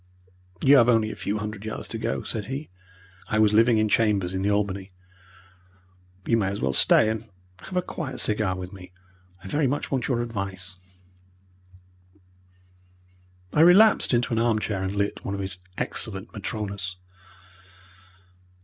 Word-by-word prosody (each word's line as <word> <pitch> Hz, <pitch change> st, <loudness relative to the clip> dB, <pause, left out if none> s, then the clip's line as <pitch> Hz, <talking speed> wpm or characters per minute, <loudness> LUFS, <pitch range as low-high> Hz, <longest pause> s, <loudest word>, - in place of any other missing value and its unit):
"You 140 Hz, +1 st, +8 dB
have 120 Hz, -1 st, +5 dB
only 110 Hz, -2 st, +3 dB
a -, -, -7 dB
few 105 Hz, -, -3 dB
hundred 105 Hz, -1 st, -6 dB
yards 110 Hz, -, -5 dB
to -, -, -4 dB
go," -, -, -2 dB
said 105 Hz, -2 st, -4 dB
he 135 Hz, +1 st, -6 dB, 0.6 s
I 110 Hz, -, -1 dB
was 105 Hz, -1 st, +4 dB
living 115 Hz, +1 st, +5 dB
in 110 Hz, 0 st, +2 dB
chambers 105 Hz, -4 st, +1 dB
in 95 Hz, -, -2 dB
the 100 Hz, -, +1 dB
Albany. 100 Hz, -2 st, -1 dB, 1.3 s
"You 115 Hz, -, +2 dB
may 100 Hz, -4 st, 0 dB
as 100 Hz, +1 st, -3 dB
well 65 Hz, 0 st, 0 dB
stay 110 Hz, -, +5 dB
and 110 Hz, 0 st, -3 dB, 0.3 s
have 185 Hz, -, -6 dB
a 180 Hz, -, +1 dB
quiet 150 Hz, -7 st, -5 dB
cigar 105 Hz, -3 st, +1 dB
with 90 Hz, +1 st, -7 dB
me. 90 Hz, -2 st, -12 dB, 0.5 s
I -, -, -8 dB
very 145 Hz, +7 st, +1 dB
much 145 Hz, +3 st, -3 dB
want 130 Hz, -3 st, -1 dB
your 120 Hz, -3 st, 0 dB
advice." 95 Hz, -4 st, -5 dB, 2.8 s
I -, -, +1 dB
relapsed 190 Hz, +6 st, +6 dB
into 120 Hz, -1 st, +1 dB
an 115 Hz, -, +1 dB
arm 115 Hz, -1 st, +2 dB
chair 105 Hz, -2 st, -2 dB
and 95 Hz, +1 st, -3 dB
lit 100 Hz, 0 st, -2 dB
one 100 Hz, -, -3 dB
of -, -, -5 dB
his 95 Hz, -2 st, -3 dB, 0.2 s
excellent 100 Hz, 0 st, -2 dB
Matronas. 100 Hz, -3 st, -4 dB
105 Hz, 160 wpm, -25 LUFS, 95-115 Hz, 2.8 s, You